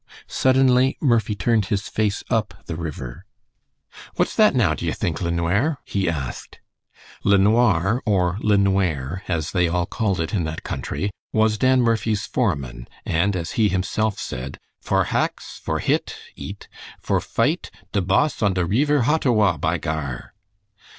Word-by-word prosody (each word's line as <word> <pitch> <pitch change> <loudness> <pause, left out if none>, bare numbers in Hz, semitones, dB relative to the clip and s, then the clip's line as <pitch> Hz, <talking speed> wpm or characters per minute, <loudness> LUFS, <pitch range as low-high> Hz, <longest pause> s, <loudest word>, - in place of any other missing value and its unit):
Suddenly 130 0 +3
Murphy 115 -6 +2
turned 110 0 +1
his 100 -1 -1
face 105 0 -1
up 115 -3 0
the 85 - -5
river. 75 -7 -6 0.9
"What's - - +1
that - - +5
now, - - +3
d'ye - - -2
think, 85 - -2
LeNware?" 90 - +1
he 95 -3 -1
asked. 70 -6 -5 0.6
LeNoir, 100 +1 +3
or 95 -3 +1
"LeNware," 95 -6 +1
as 80 -4 -1
they 90 -2 +2
all 85 +1 0
called 100 -1 -1
it 80 +4 -2
in 95 -5 +1
that 80 0 -5
country, 100 +1 -3 0.2
was 110 0 +2
Dan 130 -1 +4
Murphy's 110 -2 +1
foreman, 70 - -2 0.2
and 90 +4 +1
as 85 -2 -3
he 110 -5 +2
himself 100 +3 -1
said, 65 +2 -5 0.2
"for - - +1
haxe, - - -2
for - - -2
hit - - -1 0.2
(eat), - - -8 0.3
for - - 0
fight - - 0 0.2
de 100 - +1
boss 95 +12 +1
on 100 -3 +2
de 90 -2 +1
reever 140 - +2
Hottawa! 115 - +3
by - - 0
Gar!" 70 -6 -4
100 Hz, 145 wpm, -22 LUFS, 85-110 Hz, 0.9 s, that